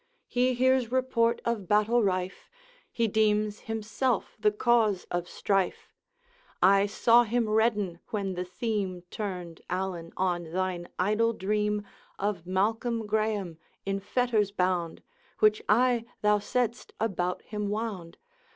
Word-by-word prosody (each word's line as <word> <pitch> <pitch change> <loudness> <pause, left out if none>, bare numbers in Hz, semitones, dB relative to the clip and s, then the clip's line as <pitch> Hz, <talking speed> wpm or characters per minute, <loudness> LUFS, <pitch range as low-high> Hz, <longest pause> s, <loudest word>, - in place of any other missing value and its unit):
He 250 +1 +1
hears 255 -1 +2
report 250 -3 +1
of 225 -5 -1
battle 215 +4 +3
rife, 185 -2 -2 0.4
He 230 -1 +1
deems 215 0 +1
himself 225 +2 -2
the 210 0 +3
cause 215 -3 +2
of 175 0 -2
strife. 195 -3 -1 0.7
I 195 +2 +5
saw 230 +3 +5
him 235 0 0
redden 215 -5 +1
when 200 -3 -2
the 180 0 -3
theme 185 -1 -3
Turned, 180 -5 -5
Allan, 180 -2 -3
on 175 -3 -1
thine 185 -2 -2
idle 215 +5 +2
dream 210 0 -1 0.3
Of 195 -4 -2
Malcolm 225 +4 0
Graeme 210 -5 -1 0.3
in 195 0 -1
fetters 215 0 +1
bound, 180 -4 -1 0.3
Which 215 0 +4
I, 240 +2 +3 0.2
thou 210 0 +4
saidst, 240 +3 -2
about 180 -5 -1
him 210 -2 -4
wound. 205 -6 -4
210 Hz, 125 wpm, -28 LUFS, 185-225 Hz, 0.7 s, I